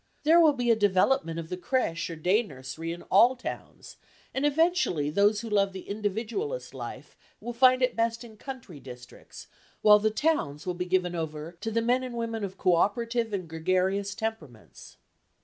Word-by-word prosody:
There 325 +3 +6
will 315 -3 +6
be 245 -3 +1
a - - +5
development 190 -3 +2
of 165 -1 -6
the 180 - -4
crèche 180 -6 -1
or 165 - -5
day 180 +8 +2
nursery 150 - -7
in 170 - -7
all 235 +7 +5
towns, 255 - -8 0.4
and 275 +2 +1
eventually 295 - +1
those 205 +4 +3
who 230 - -7
love 200 -2 +2
the 190 - -9
individualist 225 - -3
life - - -8 0.2
will 240 - -6
find 255 +1 +5
it 250 - +1
best 230 +1 -1
in 225 -2 -12
country 235 - -9
districts, 125 -2 -12 0.4
while 210 0 +8
the 215 +1 +2
towns 215 - -1
will 180 - -1
be 180 +1 -4
given 180 -1 0
over 160 -1 -5
to 225 - -2
the 230 +1 0
men 245 +2 +2
and 255 -2 -6
women 230 -2 -3
of 190 -1 -5
co 180 - +2
operative 230 +4 0
and 190 -4 -3
gregarious 185 +5 -1
temperaments. 205 - -7
205 Hz, 185 wpm, -27 LUFS, 175-240 Hz, 0.4 s, while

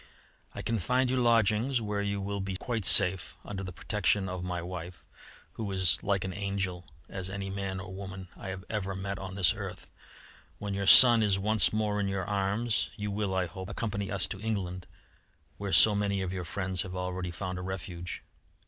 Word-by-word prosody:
I - - -6
can 115 -1 -1
find 125 +7 +1
you 130 - 0
lodgings 115 +1 +2
where 105 -2 -2
you 100 0 -2
will 100 0 -3
be 95 -1 -4
quite 115 -2 -3
safe 90 -4 +6
under 100 -2 -5
the 95 -2 -6
protection 100 +2 0
of 90 -1 -5
my 90 -1 -3
wife, 85 0 -7 0.5
who 105 -3 -5
is 95 -2 +4
as - - -21
like 100 -2 0
an 95 -1 -4
angel 95 -3 -3 0.2
as 95 -1 -5
any 95 0 -5
man 95 -1 -4
or 95 0 -8
woman 95 -1 -8
I - - -9
have 95 0 -6
ever 100 -3 -3
met 95 0 -4
on 95 -1 -7
this 95 -4 +4
earth. - - -8 0.7
When 100 +1 -5
your 100 0 -2
son 120 -1 +10
is 100 -3 +2
once 105 +1 +3
more 105 -1 -1
in 100 - 0
your 95 -2 -2
arms, 105 +4 0
you 105 -1 -4
will, 100 -2 -2
I 95 -1 +1
hope, 95 +3 -8
accompany 100 -1 -3
us 95 -2 -1
to 95 - -5
England, 95 -5 -3 0.7
where 100 -1 -4
so 110 - +7
many 100 -1 -1
of 95 0 -4
your 90 -2 -4
friends 95 +1 -2
have 95 -1 -6
already 90 0 -3
found 90 +1 -5
a - - -5
refuge. 90 -2 -6
95 Hz, 200 wpm, -29 LUFS, 95-105 Hz, 0.7 s, son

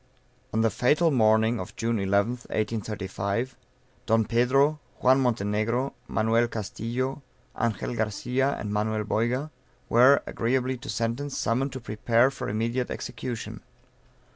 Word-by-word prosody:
On 110 - +1
the 115 -1 +3
fatal 150 - +3
morning 110 -2 +3
of 90 - -7
June 115 0 0
11th, 100 +5 0
1835, 105 +1 -2 0.5
Don 115 -1 +3
Pedro, 135 +6 +3 0.2
Juan 130 +1 +5
Montenegro, 115 +2 0
Manuel 115 +2 +2
Castillo, 120 +5 -3 0.4
Angel 115 +1 -1
Garcia 125 +5 0
and 105 0 -4
Manuel 105 +1 0
Boyga, 120 +8 -1 0.4
were, 130 +4 +6
agreeably 130 +2 0
to 135 +3 -10
sentence, 115 +6 -2
summoned 130 +4 0
to 130 - -5
prepare 115 +3 +2
for - - -5
immediate 115 +4 -1
execution. 120 -3 -5
115 Hz, 120 wpm, -26 LUFS, 110-130 Hz, 0.5 s, were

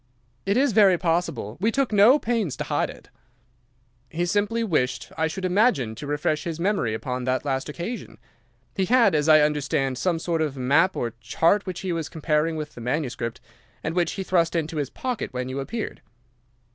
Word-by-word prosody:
"'It 200 +3 +2
is 275 0 +3
very 200 -4 +5
possible. 165 - -1
We 215 +5 +2
took 270 0 0
no 210 +7 +7
pains 220 - -1
to - - -2
hide - - -1
it.' - - -13 1.0
"'He 175 +4 -1
simply 210 +5 0
wished, 150 - -1
I 160 0 +1
should 185 +4 -4
imagine, 180 - +2
to 145 +6 -8
refresh 150 +1 -1
his 165 -1 -4
memory 175 - 0
upon 125 +1 -4
that 130 +2 0
last 135 0 -2
occasion. 175 +11 -6 0.6
He 190 - +1
had, 240 -1 +4
as 150 0 +2
I 155 -1 +8
understand, 140 -3 0
some 180 -3 +1
sort 165 0 -1
of 145 -3 -2
map 145 +9 +3
or 115 -2 -2
chart 190 +10 +1
which 185 -2 -4
he 185 -2 -2
was 165 -2 -3
comparing 155 0 0
with 150 -1 -5
the 120 - -10
manuscript, 125 -2 -3 0.4
and 160 - -2
which 175 -2 +1
he 195 - -4
thrust 170 -3 +1
into 160 -1 -2
his 145 -3 -1
pocket 250 - -4
when 125 0 -3
you 130 +1 -3
appeared. 220 +11 -5
165 Hz, 190 wpm, -24 LUFS, 140-195 Hz, 1.0 s, I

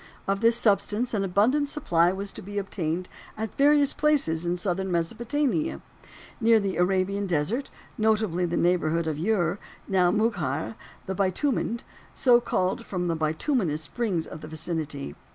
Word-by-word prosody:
Of 195 +1 0
this 230 0 +5
substance 220 +1 +1
an 205 -2 +1
abundant 230 +10 +2
supply 175 - +2
was 195 +1 -4
to - - -9
be 205 +1 -7
obtained 180 -3 -2 0.3
at 220 -1 -4
various 290 0 +4
places 175 - +2
in 175 +1 0
southern 190 +1 -1
Mesopotamia, 220 - -1 0.6
near 225 0 +5
the 195 -2 -2
Arabian 195 +2 +1
desert, 185 - -1 0.3
notably 215 -5 +2
in - - -3
the 175 - -1
neighborhood 170 -2 +1
of 155 0 -2
Ur, 195 -3 +1 0.3
now 185 -2 +3
Mugheir, 175 - 0 0.3
"the 190 - -3
bitumened," 220 +5 0 0.3
so 245 -2 +5
called 185 -5 -1
from 180 -2 -3
the 165 - +1
bitumenous 160 - 0
springs 180 -1 -2
of 155 - -9
the - - -8
vicinity. 155 - -4
190 Hz, 155 wpm, -26 LUFS, 170-225 Hz, 0.6 s, this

